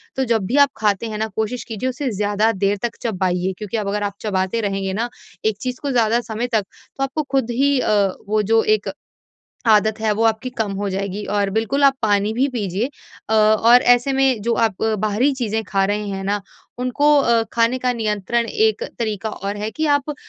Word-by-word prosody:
तो 265 Hz, -, 0 dB
जब 225 Hz, -5 st, 0 dB
भी 235 Hz, -, -2 dB
आप -, -, -13 dB
खाते 210 Hz, +1 st, 0 dB
हैं 215 Hz, -, -4 dB
न -, -, -1 dB
कोशिश 220 Hz, +3 st, -2 dB
कीजिए 225 Hz, +3 st, -3 dB
उसे 270 Hz, +1 st, -3 dB
ज़्यादा 205 Hz, +2 st, +1 dB
देर 200 Hz, +1 st, +2 dB
तक 230 Hz, -, -13 dB
चबाइए 185 Hz, -4 st, -1 dB
क्योंकि 210 Hz, +1 st, -4 dB
अब 210 Hz, -2 st, -2 dB
अगर 205 Hz, +1 st, -1 dB
आप 200 Hz, -1 st, -2 dB
चबाते 195 Hz, +1 st, -1 dB
रहेंगे 195 Hz, -2 st, -2 dB
न 240 Hz, -, -2 dB, 0.4 s
एक 220 Hz, -2 st, +1 dB
चीज़ 255 Hz, -1 st, -4 dB
को 285 Hz, -, -2 dB
ज़्यादा 235 Hz, -2 st, +2 dB
समय 230 Hz, +1 st, -3 dB
तक 215 Hz, -, +2 dB, 0.3 s
तो 270 Hz, -, -1 dB
आपको 270 Hz, +3 st, -2 dB
खुद 265 Hz, -4 st, +1 dB
ही 275 Hz, +3 st, +2 dB
अ, 215 Hz, -, 0 dB, 0.4 s
वो 215 Hz, +1 st, +2 dB
जो 225 Hz, +2 st, +3 dB
एक 205 Hz, -1 st, -7 dB, 0.8 s
आदत 215 Hz, +1 st, +3 dB
है 220 Hz, -1 st, +1 dB
वो -, -, +2 dB
आपकी 225 Hz, +3 st, 0 dB
कम 220 Hz, -5 st, -2 dB
हो 205 Hz, +1 st, -2 dB
जाएगी। 195 Hz, +1 st, -3 dB
और 200 Hz, -1 st, +1 dB
बिल्कुल 225 Hz, +6 st, 0 dB
आप 275 Hz, -1 st, +6 dB
पानी 205 Hz, 0 st, +2 dB
भी 255 Hz, +4 st, +2 dB
पीजिए 205 Hz, 0 st, -1 dB, 0.4 s
अ -, -, +3 dB
और 220 Hz, +3 st, +5 dB
ऐसे 245 Hz, +3 st, +2 dB
में 265 Hz, -3 st, +2 dB
जो 235 Hz, +2 st, 0 dB
आप 195 Hz, -5 st, -2 dB
बाहरी 215 Hz, +4 st, +1 dB
चीज़ें 225 Hz, -4 st, -2 dB
खा 195 Hz, 0 st, 0 dB
रहे 205 Hz, +1 st, -1 dB
हैं 195 Hz, -1 st, -4 dB
न 205 Hz, 0 st, 0 dB, 0.4 s
उनको 255 Hz, +4 st, 0 dB
अ, 235 Hz, -3 st, +3 dB
खाने 235 Hz, +2 st, +2 dB
का 250 Hz, 0 st, 0 dB
नियंत्रण 225 Hz, 0 st, -1 dB
एक 440 Hz, -, +1 dB, 0.2 s
तरीक़ा 220 Hz, -2 st, -2 dB
और 200 Hz, 0 st, -5 dB
है 210 Hz, +1 st, -3 dB
कि 315 Hz, +6 st, -2 dB
आप 290 Hz, 0 st, +1 dB
220 Hz, 210 wpm, -20 LUFS, 205-245 Hz, 0.8 s, आप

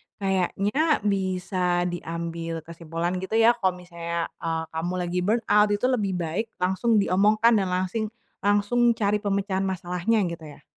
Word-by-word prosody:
kayaknya 200 Hz, -, +1 dB
bisa 185 Hz, -3 st, 0 dB
diambil 165 Hz, -1 st, -5 dB
kesimpulan, 170 Hz, +2 st, -4 dB
gitu 190 Hz, +4 st, -4 dB
ya, 225 Hz, +1 st, +6 dB
kalau 185 Hz, -3 st, +1 dB
misalnya, 170 Hz, -1 st, -5 dB
eee, 165 Hz, -1 st, -2 dB
kamu 165 Hz, +3 st, -3 dB
lagi 180 Hz, 0 st, -1 dB
burnout 210 Hz, +1 st, +3 dB
itu 205 Hz, -, -1 dB
lebih 205 Hz, -6 st, 0 dB
baik 180 Hz, +6 st, -2 dB
langsung 190 Hz, +6 st, +1 dB
diomongkan 210 Hz, +5 st, +4 dB
dan 205 Hz, -4 st, +2 dB
langsing 185 Hz, +4 st, -1 dB, 0.3 s
langsung 205 Hz, +4 st, +2 dB
cari 210 Hz, -2 st, +1 dB
pemecahan 200 Hz, -1 st, -1 dB
masalahnya, 190 Hz, +3 st, 0 dB
gitu 165 Hz, -2 st, -7 dB
ya. 145 Hz, -, -12 dB
190 Hz, 140 wpm, -25 LUFS, 175-210 Hz, 0.3 s, ya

